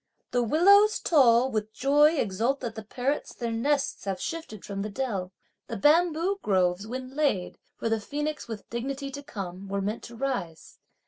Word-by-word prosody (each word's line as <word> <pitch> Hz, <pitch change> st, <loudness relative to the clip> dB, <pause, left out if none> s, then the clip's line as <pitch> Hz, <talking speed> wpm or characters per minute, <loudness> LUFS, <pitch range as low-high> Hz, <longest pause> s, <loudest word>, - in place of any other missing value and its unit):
The 245 Hz, -, +2 dB
willows 400 Hz, -, +5 dB
tall 260 Hz, -5 st, +4 dB
with 215 Hz, 0 st, -2 dB
joy 295 Hz, +5 st, +4 dB
exult 230 Hz, +3 st, 0 dB
that 235 Hz, -3 st, -4 dB
the 220 Hz, -, -6 dB
parrots 255 Hz, +7 st, -3 dB
their 235 Hz, -2 st, -3 dB
nests 275 Hz, +4 st, 0 dB
have 195 Hz, -2 st, -2 dB
shifted 320 Hz, -, -6 dB
from 195 Hz, -1 st, -4 dB
the 210 Hz, -, -3 dB
dell. 200 Hz, -6 st, -3 dB, 0.4 s
The -, -, -4 dB
bamboo 335 Hz, -, +3 dB
groves, 185 Hz, -, +1 dB
when 255 Hz, +2 st, -6 dB
laid, 275 Hz, -12 st, 0 dB, 0.2 s
for -, -, -2 dB
the 225 Hz, -1 st, 0 dB
phoenix 295 Hz, +5 st, -4 dB
with 220 Hz, -3 st, -7 dB
dignity 275 Hz, +4 st, -4 dB
to 285 Hz, +1 st, -6 dB
come, 195 Hz, -7 st, -7 dB
were 200 Hz, +1 st, -2 dB
meant 205 Hz, +3 st, -2 dB
to 235 Hz, -, -10 dB
rise. 230 Hz, -, -4 dB
240 Hz, 175 wpm, -27 LUFS, 205-290 Hz, 0.4 s, willows